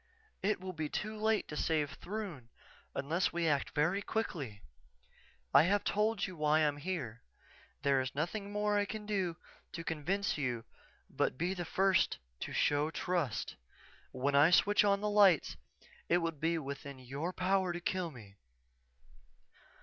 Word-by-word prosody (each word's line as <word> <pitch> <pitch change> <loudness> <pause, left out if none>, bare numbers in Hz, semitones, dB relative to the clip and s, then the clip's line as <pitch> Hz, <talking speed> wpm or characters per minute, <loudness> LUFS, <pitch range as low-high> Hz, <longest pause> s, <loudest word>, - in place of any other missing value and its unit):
"_It 205 0 +1
will 185 0 -6
be 155 -3 -3
too 215 +6 -3
late 220 0 +1
to 150 - -5
save 150 -2 0
Throon 175 - -6 0.5
unless 165 +6 0
we 170 -1 0
act 145 -3 0
very 165 +7 +2
quickly. 145 - -3 0.9
I 140 - +9
have 200 +3 +2
told 215 0 +1
you 185 - -7
why 150 -1 +3
I - - +3
am 145 -1 +2
here. 145 -9 -4 0.6
There 140 -1 +3
is 130 +1 -4
nothing 200 +7 -2
more 210 0 +1
I 205 - +1
can 210 +1 -6
do 190 -5 -1 0.4
to 165 - -5
convince 165 +4 -1
you 120 -5 -2 0.4
but - - -1
be 175 +5 0
the 175 -2 -4
first 190 +2 +2 0.2
to - - -5
show 145 +1 +2
trust. 165 - -2 0.5
When 135 +3 -1
I 145 +3 +7
switch 205 +4 +5
on 200 -1 +3
the 210 - 0
lights 200 -5 +5 0.5
it 175 - +5
will 165 -1 0
be 165 +2 -1
within 140 -1 -6
your 135 +7 -4
power 185 0 +1
to 175 - -4
kill 180 0 -1
me. 105 -8 -13
170 Hz, 160 wpm, -33 LUFS, 145-195 Hz, 0.9 s, I